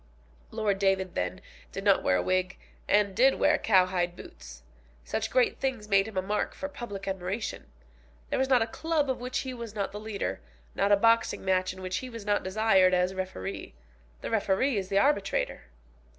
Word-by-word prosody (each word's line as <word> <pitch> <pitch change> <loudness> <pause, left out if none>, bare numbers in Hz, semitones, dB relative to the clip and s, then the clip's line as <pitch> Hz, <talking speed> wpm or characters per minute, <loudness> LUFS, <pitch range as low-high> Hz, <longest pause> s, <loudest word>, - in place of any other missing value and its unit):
Lord 205 -3 -1
David, 190 -2 +1
then, 90 0 -3 0.3
did - - -6
not - - +4
wear 95 - +2
a 90 - 0
wig, 185 0 0 0.3
and 205 -2 +2
did 265 +4 +5
wear 300 +1 +3
cowhide 185 -3 +2
boots. - - -12 0.4
Such - - -2
great 255 -1 +2
things 255 -6 -2
made 195 0 +3
him 215 -3 -8
a 185 - +1
mark 210 +2 -2
for 285 - -4
public 235 -9 -7
admiration. 190 - -4 0.6
There - - 0
was 265 0 +1
not 250 -3 +5
a - - -2
club 300 +3 -1
of 255 - -5
which 250 +1 -2
he 260 -1 -5
was 235 -3 -8
not 200 -2 -2
the 210 - -6
leader, 215 -1 -4 0.3
not 200 - +1
a 205 - +7
boxing 230 -1 +2
match 185 -1 +1
in 185 0 -10
which 185 0 -2
he 255 - -5
was 230 -4 -9
not 205 0 +1
desired 190 -2 +3
as 180 +1 +1
referee. 100 - -5 0.5
The - - -5
referee 225 +4 +1
is 190 -2 -2
the 195 - +1
arbitrator. 200 -4 +1
200 Hz, 195 wpm, -28 LUFS, 185-230 Hz, 0.6 s, a